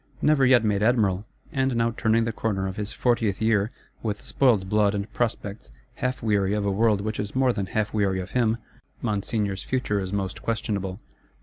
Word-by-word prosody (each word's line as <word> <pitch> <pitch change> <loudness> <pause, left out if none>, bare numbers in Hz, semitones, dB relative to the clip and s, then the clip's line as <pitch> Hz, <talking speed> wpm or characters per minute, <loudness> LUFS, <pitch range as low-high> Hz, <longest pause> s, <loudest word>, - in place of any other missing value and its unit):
Never 150 -3 +4
yet 125 -3 +6
made 105 -2 +1
Admiral, 105 -4 +2 0.3
and 135 -4 0
now 115 0 +2
turning 115 +1 +2
the 115 - -1
corner 105 -3 -1
of 95 - -5
his 105 -1 -4
fortieth 115 -5 +1
year, 110 -2 +2 0.3
with 105 -2 -2
spoiled 115 -8 +2
blood 105 0 +2
and 100 +1 -4
prospects; 105 - -3 0.3
half 125 -1 -2
weary 100 -2 +2
of 105 -1 -1
a 100 - +1
world 105 0 +2
which 110 +1 -3
is 105 +2 -4
more 130 -1 +3
than 100 -3 -2
half 110 +2 -1
weary 100 -3 +1
of 95 +1 -6
him, 115 -2 +2 0.5
Monseigneur's 105 -2 -1
future 125 -6 -1
is 95 -1 -4
most 100 -1 -3
questionable. 100 -4 -2
105 Hz, 190 wpm, -25 LUFS, 100-115 Hz, 0.5 s, yet